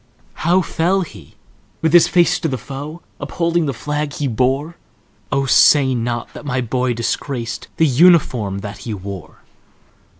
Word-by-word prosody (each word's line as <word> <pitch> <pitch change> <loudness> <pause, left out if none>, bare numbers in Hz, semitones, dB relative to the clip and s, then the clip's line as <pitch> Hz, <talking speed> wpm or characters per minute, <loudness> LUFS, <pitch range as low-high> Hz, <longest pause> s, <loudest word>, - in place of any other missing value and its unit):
"How 175 +3 +3
fell 180 +5 0
he,—with 150 - -7
his 175 - +7
face 175 0 +3
to 165 - -1
the 135 -4 -2
foe, 145 +6 -8 0.2
Upholding 170 -2 -1
the - - 0
flag 150 +4 -3
he 145 - -2
bore? 135 +7 0 0.6
Oh, 135 0 +1
say 135 0 +5
not 120 0 -3
that - - -10
my 130 -3 -2
boy 125 0 -1
disgracedThe 120 +4 -2
uniform 125 - +4
that 100 0 -7
he 110 -3 -5
wore!" 95 -2 -9
135 Hz, 140 wpm, -19 LUFS, 120-160 Hz, 0.6 s, his